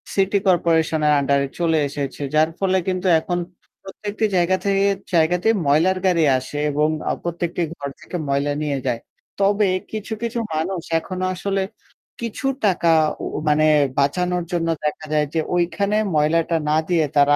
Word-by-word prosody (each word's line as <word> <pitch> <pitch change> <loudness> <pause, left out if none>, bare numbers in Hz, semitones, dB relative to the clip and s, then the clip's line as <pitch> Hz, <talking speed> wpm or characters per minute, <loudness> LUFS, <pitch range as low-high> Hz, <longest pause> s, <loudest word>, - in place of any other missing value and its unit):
City 195 +1 +2
কর্পোরেশনের 160 -3 +2
আন্ডারে 140 0 +1
চলে 165 -2 +2
এসেছে। 140 0 -5
যার 155 +1 +4
ফলে 190 -1 +2
কিন্তু 185 0 -1
এখন 175 +2 -3 0.5
প্রত্যেকটি 205 +2 -3
জায়গা 180 +1 +3
থেকে 195 0 +2 0.3
জায়গাতে 175 +4 +2 0.2
ময়লার 165 +7 +3
গাড়ি 175 -3 +3
আসে 130 +3 -6
এবং 150 +2 +2 0.2
আ - - +2
প্রত্যেকটি 175 0 -3
ঘর 140 -2 -5
থেকে - - -8
ময়লা 140 +1 0
নিয়ে 145 -2 -1
যায়। 115 -1 0 0.4
তবে 200 +1 +3 0.3
কিছু, 220 +1 -4
কিছু 235 0 -2
মানুষ 170 +3 -2 0.2
এখনো 185 +2 -4
আসলে 195 +2 -1 0.6
কিছু 235 +4 -3 0.2
টাকা 180 -3 +2 0.3
উউ - - -4
মানে 155 +1 +3 0.3
বাঁচানোর 180 +5 +1
জন্য 170 -1 0 0.2
দেখা 150 +1 -2
যায় 150 0 +3
যে 165 - +1 0.2
ওইখানে 200 +4 0 0.2
ময়লাটা 165 +3 +2
না 150 - +3
দিয়ে 165 -3 +3
তারা 145 0 +5
170 Hz, 150 wpm, -21 LUFS, 150-190 Hz, 0.6 s, তারা